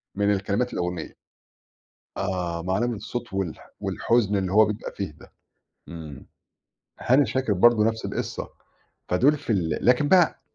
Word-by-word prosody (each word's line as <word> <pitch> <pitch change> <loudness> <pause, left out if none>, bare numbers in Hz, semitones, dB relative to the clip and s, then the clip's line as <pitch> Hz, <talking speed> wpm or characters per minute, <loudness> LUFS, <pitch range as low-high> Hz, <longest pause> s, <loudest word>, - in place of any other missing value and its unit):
من 100 0 +2
الكلمات 100 +5 -1
الأغنية. 90 -2 -3 1.0
آه، 85 -2 -2
مع 95 +2 0
نبرة 120 -1 0
الصوت 120 +2 -6
والح 95 -4 -4
والحزن 105 -4 +1
اللي 95 -1 -1
هو 110 +1 +7
بيبقى 105 +1 -4
فيه 100 -5 -3
ده. - - -16 0.6
إمم. 80 -4 -9 0.7
هاني 135 +3 +4
شاكر 130 -5 0
برضه 110 +3 +5
نفْس 110 0 -1
القِصّة، - - -4 0.6
فدُول 135 +12 +3
في - - -7
ال 85 -7 0
لكن 125 +4 +3
بقى 180 -4 +4
105 Hz, 140 wpm, -25 LUFS, 90-120 Hz, 1.0 s, هو